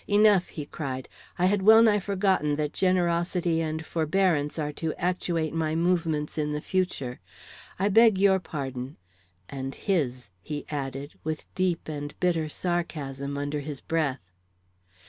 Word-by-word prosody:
"Enough!" 205 -2 +5
he 150 - -6
cried. 130 -3 -5 0.3
"I 180 - +2
had 195 +1 +2
wellnigh 220 +1 +7
forgotten 190 -6 +1
that 150 0 -2
generosity 175 -2 +1
and 160 0 -3
forbearance 160 -2 +1
are 150 -2 -1
to 160 +1 -3
actuate 170 -3 -1
my 160 -1 0
movements 165 -3 0
in 150 0 -1
the 150 - -1
future. 150 -8 -2 0.6
I 195 - +1
beg 225 0 +6
your 190 0 +4
pardon 135 -5 -5 0.5
and 135 -1 -5
his!" 130 - -1
he 150 +7 -5
added, 140 0 -4
with 155 0 -3
deep 185 -2 0
and 145 -1 -6
bitter 165 -4 +1
sarcasm, 145 -5 -3
under 145 +1 -2
his 145 -1 -6
breath. 140 - -2
160 Hz, 140 wpm, -27 LUFS, 145-185 Hz, 0.6 s, wellnigh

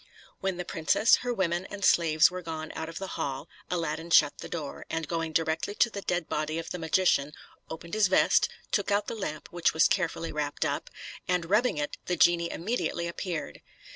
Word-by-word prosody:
When 190 -2 -2
the 180 - -4
princess, 165 +8 +3
her 245 - -3
women, 185 -4 -1
and 200 -1 -3
slaves 160 -1 +5
were 185 0 -5
gone 160 -2 -5
out 160 0 -4
of 165 - -8
the 195 - -4 0.2
hall, 140 +3 -3 0.2
Aladdin 165 -1 -2
shut 150 -3 +5
the - - -7
door, 150 -5 -5
and 160 -1 -2
going 165 -1 -2
directly 160 +5 0
to 235 - +3
the 200 - -5
dead 175 -3 -1
body 155 +1 -2
of 165 - -5
the 180 - -4
magician, 160 -3 +2 0.4
opened 165 +1 -8
his 215 -2 +4
vest, 185 - +4 0.2
took 205 -1 +1
out 205 0 +2
the - - -4
lamp, 155 -9 -5
which 175 -2 +1
was 160 - +6
carefully 170 -3 -1
wrapped 145 -1 -2
up, - - -2 0.4
and 180 -1 0
rubbing 220 -3 +3
it, 150 0 -3
the 180 - 0
genie 170 0 +4
immediately 175 -3 -2
appeared. 170 -3 -5
170 Hz, 200 wpm, -28 LUFS, 160-185 Hz, 0.4 s, was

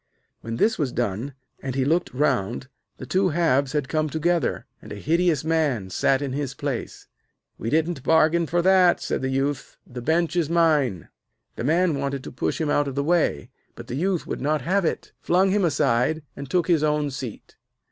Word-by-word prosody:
When 115 +1 -5
this 220 - +2
was 140 -5 0
done, 120 +4 -3 0.3
and 130 -2 -4
he 135 -1 +1
looked 165 +5 +1
round, 125 -3 0 0.3
the - - -8
two 190 0 +1
halves 145 -4 +1
had 145 -3 -1
come 155 +1 0
together, 165 +3 0 0.2
and - - -12
a - - -5
hideous 160 - +1
man 150 -12 0
sat 135 +9 +1
in 135 -2 -3
his 140 -2 -3
place. - - -5 0.5
'We 115 - -3
didn't 160 0 0
bargain 160 +3 +3
for 175 +3 0
that,' 185 -1 +5
said - - -2
the 130 - -1
Youth. 135 +1 -2
'The 125 0 -8
bench 165 +6 +1
is 170 -4 +1
mine.' 150 - +2 0.5
The - - -5
man 165 0 +2
wanted 140 -1 -3
to - - -8
push 125 - -2
him 155 -2 0
out 145 0 +2
of 135 - -5
the 140 - 0
way, 155 - 0 0.2
but - - -9
the 125 - -5
Youth 180 +3 -1
would - - -5
not 150 0 0
have 190 +4 +1
it, - - -2
flung 185 +2 +2
him 205 0 +2
aside, 150 -1 +1
and 140 -1 -8
took 175 +1 +1
his 170 -4 +3
own 150 -1 +1
seat. 125 -4 -8
150 Hz, 200 wpm, -24 LUFS, 130-170 Hz, 0.5 s, that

